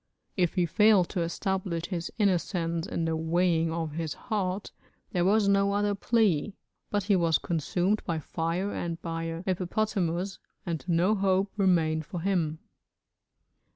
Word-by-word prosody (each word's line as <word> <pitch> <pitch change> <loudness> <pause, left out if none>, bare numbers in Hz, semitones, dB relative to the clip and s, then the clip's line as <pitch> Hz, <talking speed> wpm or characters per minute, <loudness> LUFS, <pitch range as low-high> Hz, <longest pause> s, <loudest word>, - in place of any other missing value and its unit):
If 180 -4 +1
he 180 - +3
failed 210 +1 +4
to 180 - -2
establish 170 0 -2
his 175 -3 -4
innocence 175 -4 0
in 170 - -2
the 165 0 0
weighing 165 0 +1
of 165 -1 -2
his 160 0 -3
heart, 200 -3 -3 0.4
there 175 -2 +1
was 205 +2 +3
no 200 0 +3
other 205 0 +1
plea, 205 -4 +1 0.3
but 205 -1 0
he 200 0 +3
was 165 -4 +3
consumed 175 +5 0
by 165 -3 -2
fire 165 +5 -2
and 170 -1 -3
by 165 -1 -3
a 165 +1 -4
hippopotamus, 185 -1 -1 0.3
and 170 -4 -3
no 175 +4 +3
hope 195 -1 +1
remained 165 -6 +2
for 175 - -5
him. 165 -5 0
180 Hz, 150 wpm, -28 LUFS, 165-200 Hz, 0.4 s, failed